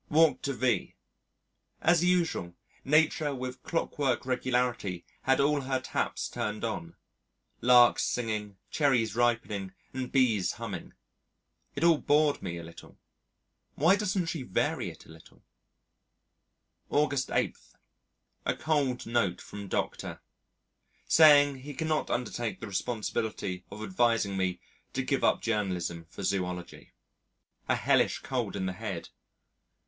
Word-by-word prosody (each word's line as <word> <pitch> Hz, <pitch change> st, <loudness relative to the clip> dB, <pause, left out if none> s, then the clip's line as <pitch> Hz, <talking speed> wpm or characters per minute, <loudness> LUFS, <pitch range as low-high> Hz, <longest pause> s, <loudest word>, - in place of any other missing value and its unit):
Walked 160 Hz, 0 st, +4 dB
to 140 Hz, -, 0 dB
V. 125 Hz, -1 st, 0 dB, 0.8 s
As 170 Hz, 0 st, +3 dB
usual, 170 Hz, -, +1 dB, 0.3 s
Nature 150 Hz, 0 st, +2 dB
with 125 Hz, 0 st, -6 dB
clockwork 145 Hz, -7 st, -1 dB
regularity 125 Hz, -7 st, -1 dB, 0.2 s
had 130 Hz, 0 st, +3 dB
all 145 Hz, +1 st, +3 dB
her 130 Hz, 0 st, -1 dB
taps 130 Hz, -, -2 dB
turned 105 Hz, +1 st, -4 dB
on 85 Hz, -7 st, -4 dB, 0.7 s
larks 120 Hz, 0 st, +6 dB
singing, 110 Hz, -4 st, -2 dB
cherries 120 Hz, -8 st, +2 dB
ripening, 110 Hz, -5 st, 0 dB, 0.2 s
and 130 Hz, -1 st, -4 dB
bees 120 Hz, -8 st, +2 dB
humming. -, -, -6 dB, 0.8 s
It 145 Hz, -, -2 dB
all 165 Hz, -3 st, +5 dB
bored 150 Hz, 0 st, +3 dB
me 85 Hz, -3 st, -4 dB
a 85 Hz, -, -7 dB
little. 85 Hz, 0 st, -13 dB, 0.8 s
Why 165 Hz, +7 st, +5 dB
doesn't 195 Hz, -3 st, 0 dB
she 165 Hz, -2 st, -3 dB
vary 95 Hz, -8 st, -1 dB
it -, -, -13 dB
a -, -, -19 dB
little? 80 Hz, -1 st, -17 dB, 1.5 s
August 145 Hz, -3 st, +1 dB
8. -, -, 0 dB, 0.9 s
A -, -, +2 dB
cold 145 Hz, -5 st, 0 dB
note 115 Hz, -6 st, 0 dB
from 100 Hz, -1 st, -8 dB
Dr. -, -, -3 dB, 0.9 s
saying 145 Hz, -3 st, +7 dB
that 135 Hz, -, -11 dB
he 145 Hz, +2 st, -8 dB
cannot 155 Hz, +1 st, -1 dB
undertake 120 Hz, -1 st, -2 dB
the -, -, -6 dB
responsibility 100 Hz, -3 st, -3 dB
of 105 Hz, +2 st, -8 dB
advising 110 Hz, 0 st, +1 dB
me 95 Hz, -2 st, -1 dB, 0.3 s
to 135 Hz, -, -1 dB
give 135 Hz, 0 st, 0 dB
up -, -, +3 dB
journalism 90 Hz, -7 st, -2 dB
for 100 Hz, -, -8 dB
zoology. 90 Hz, -2 st, -3 dB, 0.8 s
A -, -, +4 dB
hellish -, -, +2 dB
cold -, -, -2 dB
in 95 Hz, -1 st, -2 dB
the 95 Hz, -, -2 dB
head. 95 Hz, -4 st, -5 dB
120 Hz, 130 wpm, -29 LUFS, 100-145 Hz, 1.5 s, saying